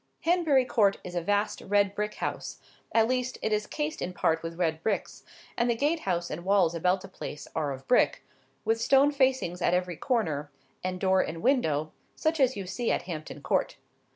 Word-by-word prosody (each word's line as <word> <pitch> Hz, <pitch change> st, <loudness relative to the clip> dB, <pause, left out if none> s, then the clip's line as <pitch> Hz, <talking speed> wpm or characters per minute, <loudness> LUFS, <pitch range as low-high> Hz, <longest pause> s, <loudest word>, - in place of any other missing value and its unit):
Hanbury 325 Hz, -7 st, +3 dB
Court 205 Hz, -5 st, +3 dB
is 180 Hz, -, -7 dB
a 175 Hz, -, -1 dB
vast 205 Hz, +4 st, 0 dB
red 200 Hz, 0 st, +2 dB
brick 210 Hz, +1 st, -3 dB
house—at 225 Hz, -1 st, -2 dB
least, 255 Hz, 0 st, -1 dB
it 220 Hz, -, +1 dB
is 210 Hz, 0 st, 0 dB
cased 305 Hz, +1 st, -3 dB
in 180 Hz, -, -3 dB
part 160 Hz, -2 st, +1 dB
with 165 Hz, 0 st, -6 dB
red 160 Hz, -3 st, 0 dB
bricks; 205 Hz, +2 st, -2 dB, 0.3 s
and 235 Hz, 0 st, +1 dB
the 235 Hz, -, +2 dB
gate 295 Hz, +7 st, +1 dB
house 175 Hz, -, -2 dB
and 170 Hz, +3 st, -5 dB
walls 190 Hz, -3 st, +3 dB
about 180 Hz, +3 st, +1 dB
the -, -, -9 dB
place 150 Hz, -, -8 dB
are 150 Hz, -3 st, 0 dB
of 135 Hz, 0 st, -8 dB
brick,—with 225 Hz, -2 st, 0 dB
stone 275 Hz, +4 st, +5 dB
facings 260 Hz, -10 st, +1 dB
at 175 Hz, -, +3 dB
every 180 Hz, -1 st, -1 dB
corner, 160 Hz, -, -1 dB, 0.3 s
and 185 Hz, 0 st, -2 dB
door, 190 Hz, 0 st, +3 dB
and 165 Hz, +1 st, -5 dB
window, 160 Hz, -, +2 dB, 0.2 s
such 315 Hz, 0 st, 0 dB
as 260 Hz, -3 st, +3 dB
you 195 Hz, -, -4 dB
see 235 Hz, +6 st, -1 dB
at -, -, 0 dB
Hampton 155 Hz, -4 st, -7 dB
Court. -, -, 0 dB
200 Hz, 190 wpm, -28 LUFS, 170-250 Hz, 0.3 s, stone